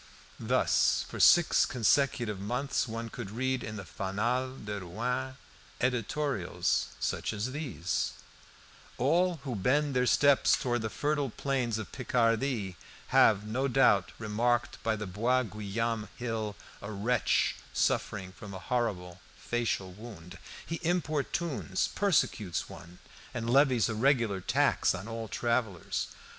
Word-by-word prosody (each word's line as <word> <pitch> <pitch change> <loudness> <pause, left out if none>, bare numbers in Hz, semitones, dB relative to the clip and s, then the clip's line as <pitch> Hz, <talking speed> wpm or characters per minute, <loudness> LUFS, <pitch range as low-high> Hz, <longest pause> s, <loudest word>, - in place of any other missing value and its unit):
Thus, - - +2
for - - -7
six 175 -2 +6
consecutive 120 -3 +1
months, 125 +8 -1
one 115 0 -5
could 115 -3 -7
read 130 +3 -1
in 110 - -5
the 100 -3 -7
"Fanal 120 +9 -2
de 105 -1 -3
Rouen" 125 +8 -3 0.4
editorials 125 -7 0
such - - -1
as 110 +4 -3
these 135 - -2 0.8
"All 170 +4 +2
who 130 -4 -3
bend 135 +8 +1
their 125 0 +2
steps 140 +1 +5
towards 120 -2 -1
the 110 - -2
fertile 145 +3 -1
plains 125 -3 -1
of 110 - -6
Picardy 115 -5 0 0.3
have, 105 -1 +5
no 125 +6 -1
doubt, 120 -9 +4
remarked, 120 +2 0
by 115 -1 0
the 105 0 -5
Bois 115 +7 +1
Guillaume 110 +1 -3
hill, 110 -4 -3 0.3
a 100 - -6
wretch 110 +4 +1
suffering 95 -3 0
from 100 0 -10
a - - -4
horrible 95 -6 -2 0.2
facial 115 -5 -2
wound. 100 -4 -11 0.3
He 165 - -4
importunes, 160 -3 -1
persecutes 110 - +1
one, 90 +1 -12 0.4
and 115 -1 -3
levies 130 -3 +4
a 115 - -2
regular 115 -4 +2
tax 90 - +2
on 95 +3 -7
all 115 -1 -5
travellers. 115 -5 -1
115 Hz, 130 wpm, -30 LUFS, 105-130 Hz, 0.8 s, six